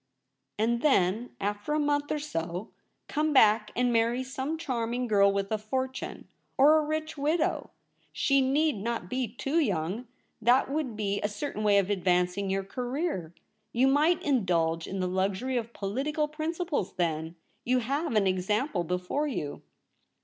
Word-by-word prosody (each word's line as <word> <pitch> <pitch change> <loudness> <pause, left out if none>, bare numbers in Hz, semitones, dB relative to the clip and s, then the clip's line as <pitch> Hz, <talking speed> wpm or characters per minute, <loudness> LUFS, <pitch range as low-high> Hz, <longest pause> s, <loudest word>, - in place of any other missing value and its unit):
' - - -54
And 235 +2 +1
then, 225 -4 +2
after 205 +7 -2
a - - +2
month 290 0 0
or 305 - +1
so, 180 - -4 0.4
come 305 0 0
back 215 -4 +5
and 245 0 +2
marry 235 +2 +2
some 265 +4 -3
charming 250 -5 -2
girl 200 -3 +4
with 195 +1 -2
a 215 - 0
fortune, 260 +5 -4 0.3
or 300 +4 +7
a - - 0
rich 310 0 -3
widow 305 +3 0 0.2
— - - -40
she 275 -1 +2
need 285 +1 +2
not 215 -3 -3
be 255 -1 0
too 275 +9 -1
young 200 - -1 0.2
— - - -45
that 245 +4 +4
would 285 -6 -2
be 205 -1 -1
a 205 - 0
certain 215 +1 -4
way 205 -1 +4
of 200 0 +2
advancing 180 0 +1
your 195 0 0
career! 245 - -3 0.4
You 255 +3 +4
might 305 +5 +3
indulge 170 - +1
in 190 0 -3
the 185 - 0
luxury 190 +7 -1
of 235 -1 -2
political 275 +10 -2
principles 310 - -3
then. 165 -2 -1 0.3
You 255 +1 +2
have 275 +3 -1
an 210 -2 +4
example 190 - 0
before 180 - -1
you.' 150 - -4
235 Hz, 165 wpm, -28 LUFS, 195-285 Hz, 0.4 s, or